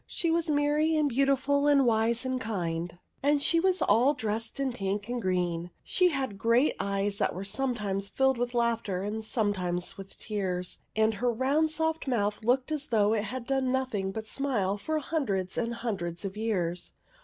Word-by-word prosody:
She 335 -2 -1
was 330 -1 +1
merry 300 +2 +2
and 305 -1 +3
beautiful 275 +2 +2
and 280 -2 +5
wise 230 +1 +2
and 255 0 -1
kind; 175 -6 -3 0.2
and 290 +1 +3
she 330 +4 +3
was 375 +1 +2
all 260 +6 +4
dressed 225 +2 -3
in 270 -2 0
pink 200 -1 -2
and 245 0 -2
green, 180 -3 0
and - - -12
she 365 -1 +3
had 265 - -3
great 235 +6 +3
eyes 200 0 -1
that - - 0
were 185 - -4
some 245 +6 -1
times 200 -2 -3
filled 265 0 +2
with 245 0 -2
laughter 230 -5 0
and 215 +2 -3
sometimes 190 -6 -1
filled - - -17
with - - -18
tears, 185 -4 -3 0.2
and 220 0 +3
her 245 +3 0
round 275 +7 +2
soft 320 -1 -1
mouth 210 -4 0
looked 255 +5 +1
as 300 -1 -2
though 215 -4 +3
it 215 -1 0
had 250 +2 -5
done 265 0 0
nothing 250 -8 -1
but 220 +2 -5
smile 220 -6 0
for 310 +10 -2
hun 310 +1 -1
dreds 190 -2 -1
and 235 0 -1
hundreds 190 -7 -3
of 195 0 -4
years. 180 -6 -2
230 Hz, 195 wpm, -29 LUFS, 200-275 Hz, 0.2 s, and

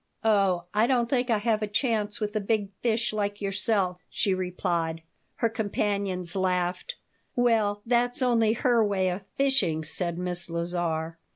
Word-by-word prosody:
"Oh, 195 -5 +3
I 215 +3 +3
don't 245 -3 +2
think 250 0 0
I 225 - +3
have 215 0 0
a 215 - -1
chance 210 -1 0
with 210 0 -3
a - - +2
big 205 -1 -1
fish 235 -1 0
like 205 -1 -2
yourself," 195 -2 0
she 200 -4 +1
replied 170 -3 -2 0.3
Her 230 - +1
companions 200 -4 -1
laughed 185 - -1 0.4
"Well, 220 -4 +2
that's 245 +2 +1
only 230 -3 +3
her 235 -1 +3
way 195 -3 +1
of 185 +2 -4
fishing," 210 - +1
said 170 +2 -1
Miss 180 -1 -1
Lazar. 170 -1 -2
205 Hz, 155 wpm, -27 LUFS, 180-225 Hz, 0.4 s, Oh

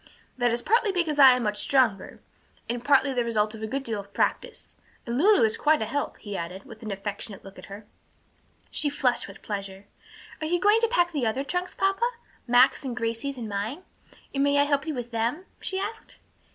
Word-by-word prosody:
"That 245 -1 +2
is 235 +1 -1
partly 450 -1 +3
because 330 -5 0
I 265 -2 +9
am 250 - -2
much 210 -1 -1
stronger, 240 -8 +1 0.5
and 240 0 -3
partly 275 0 +3
the 245 -1 +1
result 215 -2 0
of 220 - -9
a 220 - -3
good 270 +5 -3
deal 225 -5 -3
of 200 0 -12
practice. 485 -1 -2 0.3
And 235 - -3
Lulu 390 - +5
is 220 -1 +2
quite 310 +1 +3
a 220 - -1
help," 285 +6 -3
he 205 -3 -7
added, 180 +2 -5
with 225 -5 -13
an 220 - -6
affectionate 200 0 -5
look 195 0 -12
at - - -11
her. 200 +2 -10 0.9
She 295 - +2
flushed 265 -4 0
with - - -13
pleasure. 200 -1 -5 0.6
"Are 310 - -1
you 350 +2 +1
going 415 +4 +5
to 460 - +3
pack 350 -7 +2
the 280 -8 -1
other 255 +5 -1
trunks, 360 +5 -3
papa? 390 +5 +1 0.4
Max's 245 +4 +5
and 250 -3 -4
Grade's 230 +4 -2
and 230 -3 -5
mine? 215 - -4 0.5
And 275 0 +1
may 285 0 +3
I 285 - +6
help 285 +1 0
you 310 - -2
with 240 -1 -5
them?" 235 +10 -1 0.2
she 380 - -2
asked. 425 +3 -5
250 Hz, 215 wpm, -26 LUFS, 220-310 Hz, 0.9 s, I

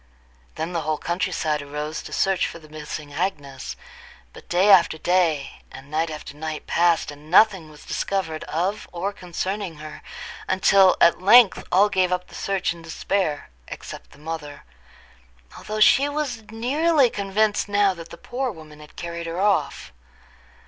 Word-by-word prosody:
Then 165 +3 -4
the 170 - -1
whole 155 0 -1
country 180 +3 -2
side 155 -3 -1
arose 150 +2 -5
to - - -10
search 195 -2 +1
for - - -8
the 155 -2 -15
missing 150 -1 -8
Agnes; 145 - -4 0.6
but - - -14
day 185 +4 +4
after 170 -4 +6
day 165 -5 0
and 140 +2 -12
night 160 +2 0
after 150 -2 -8
night 155 0 -5
passed, 170 -3 +2
and 145 +1 -14
nothing 190 -3 +4
was 150 -1 -15
discovered 170 -6 -2
of 185 +7 -2
or 185 +4 -3
concerning 185 0 -4
her, 155 0 -9 0.5
until 190 0 +5
at 170 +1 +4
length 220 +2 +6
all 195 +3 +5
gave 185 -2 +1
up 180 0 -2
the - - -16
search 195 -3 -1
in 170 - -13
despair 165 - -2 0.2
except - - -9
the - - -18
mother, 150 -1 -7 0.9
although 215 0 -5
she 275 +6 +5
was 280 -7 -3
nearly 275 +6 +2
convinced 205 +1 0
now 200 -1 +3
that 170 -2 -10
the - - -10
poor 255 +8 -3
woman 155 -4 -13
had 150 0 -15
carried 170 0 -6
her 165 +2 -4
off. 200 0 0
175 Hz, 165 wpm, -23 LUFS, 155-200 Hz, 0.9 s, after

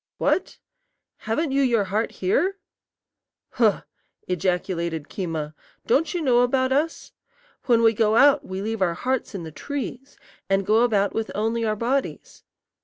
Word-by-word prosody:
"What? 380 - 0 0.6
haven't 270 +8 -2
you 275 +1 +2
your 235 -5 +2
heart 210 +4 -1
here?" 345 - 0 0.9
"Huh!" 220 -5 +2 0.4
ejaculated 175 -3 -2
Keema; 160 -5 -4 0.3
"don't 280 +7 +2
you 350 - -1
know 250 -4 +4
about 260 +1 +2
us? 305 +4 -1 0.6
When 235 -2 +4
we 225 0 +5
go 220 0 +2
out 280 +4 +5
we 190 +1 -5
leave 220 -1 -3
our 175 -2 +1
hearts 260 -2 -2
in 185 - -5
the 160 - -8
trees, 270 - -6 0.3
and 195 0 +1
go 220 +3 +3
about 205 -4 +2
with 225 0 -2
only 225 +2 0
our 215 -1 0
bodies. 250 +6 -3
225 Hz, 150 wpm, -24 LUFS, 195-260 Hz, 0.9 s, we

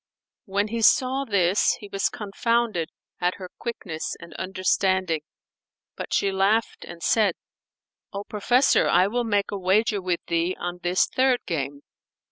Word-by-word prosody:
When 200 0 -1
he 230 +1 -2
saw 265 +4 +3
this 195 -3 +2
he 205 - -9
was 195 -1 0
confounded 220 -3 -1 0.3
at 180 +1 0
her 185 -2 -9
quickness 190 -9 -5
and 170 -1 -12
understanding; 185 -2 0 0.7
but - - -7
she 200 - +2
laughed 200 +4 +1
and 170 -1 -10
said, 210 -6 +3 0.8
"O 200 0 -5
professor, 240 +6 +2
I 180 +2 +5
will 240 +5 -1
make 205 -3 0
a 200 - -3
wager 200 +2 +2
with 180 -2 -1
thee 170 +2 0
on 175 0 -4
this 180 +1 +2
third 260 -1 +1
game. 140 -3 -3
195 Hz, 145 wpm, -25 LUFS, 180-220 Hz, 0.8 s, I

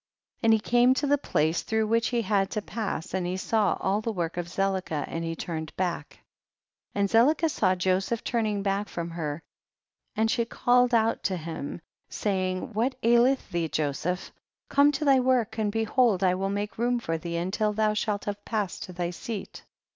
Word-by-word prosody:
50. - - -6
And 225 - +7
he 220 - +4
came 245 +4 +4
to 290 - 0
the 285 0 +3
place 160 - +1
through 220 0 0
which 230 +1 +2
he 240 -2 0
had 195 -1 +1
to 215 - -2
pass, 210 -8 -4
and 185 -2 -1
he 180 +1 -2
saw 215 +1 +1
all 195 +3 0
the 230 - -2
work 175 -5 -3
of 175 -1 -3
Zelicah, 185 -5 -1
and 165 - -4
he 165 0 -3
turned 160 -2 -5
back. 180 -2 -3 0.8
51. - - -3
And 200 - +3
Zelicah 285 - +4
saw'Joseph 185 +2 +1
turn 230 -3 0
ing 205 -2 -1
back 200 +1 -1
from 170 0 -4
her, 160 -2 -4 0.7
and 225 +1 +2
she 235 - +1
called 245 +1 +3
out 225 0 +2
to 190 -2 0
him, 160 -1 -6 0.3
saying, 185 0 -2
what 240 +5 0
aileth 240 +1 +3
thee 170 -2 0
Jo 150 -1 0
seph? 180 +6 -3 0.4
come 285 +1 +5
to 290 +2 -2
thy 270 -2 +6
work, 245 -4 +1
and 210 -1 +1
behold 225 -2 +2
I 180 -1 +4
will 195 +1 -1
make 205 +2 -3
room 245 +1 +2
for 165 -8 -2
thee 170 0 -5
until 195 +5 0
thou 215 0 +1
shalt 210 -1 -1
have 205 0 -4
passed 210 -5 -2
to 185 - -10
thy 175 0 -2
seat. 205 +3 -7
205 Hz, 200 wpm, -27 LUFS, 180-230 Hz, 0.8 s, And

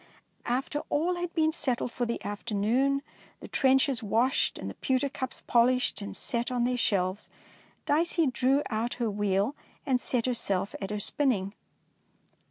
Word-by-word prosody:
After 265 +4 -1
all 345 +4 +1
had 350 -1 -3
been 315 -1 +3
settled 255 -6 -1
for 245 -1 -2
the 235 - -4
afternoon, 230 +7 0 0.4
the - - -9
trenchers 265 -1 +3
washed 230 +5 +1
and - - -6
the - - -5
pewter 265 +1 0
cups 260 -1 -6
polished 245 -1 +3
and 200 - -6
set 235 0 -2
on 245 -1 +1
their 250 +1 +1
shelves. 195 -4 0 0.6
Dicey 330 +2 +2
drew 270 +2 +2
out 225 +2 -1
her 235 -3 -1
wheel 205 +5 0 0.3
and 255 -4 +1
set 245 -3 +1
herself 205 -6 0
at 195 - -3
her 210 0 -2
spinning. 205 -5 0
245 Hz, 155 wpm, -29 LUFS, 215-275 Hz, 0.6 s, been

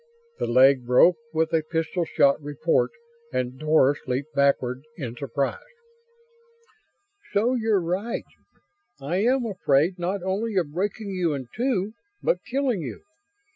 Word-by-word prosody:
The - - -1
leg 130 +1 +5
broke 125 +8 +5
with 160 +1 0
a 160 - +3
pistol 165 +2 -2
sharp 140 -3 +3
report 150 - +1 0.4
and 125 +1 -2
Doris 150 -2 +3
leaped 135 +4 -3
backward 130 -2 +1 0.2
in 125 -7 -5
surprise. 140 - -2 1.7
"So 230 +5 +2
you're 220 -5 +2
right. 185 +7 -2 0.7
I 145 +6 -2
am 245 +5 +2
afraid, 180 -4 +1
not 180 +2 -2
only 200 +4 -2
of 170 -6 0
breaking 200 +3 -2
you 175 -5 0
in 130 -3 -7
two, 220 -4 0 0.3
but - - +1
killing 260 -6 -1
you. 125 -8 -7
170 Hz, 135 wpm, -25 LUFS, 140-205 Hz, 1.7 s, leg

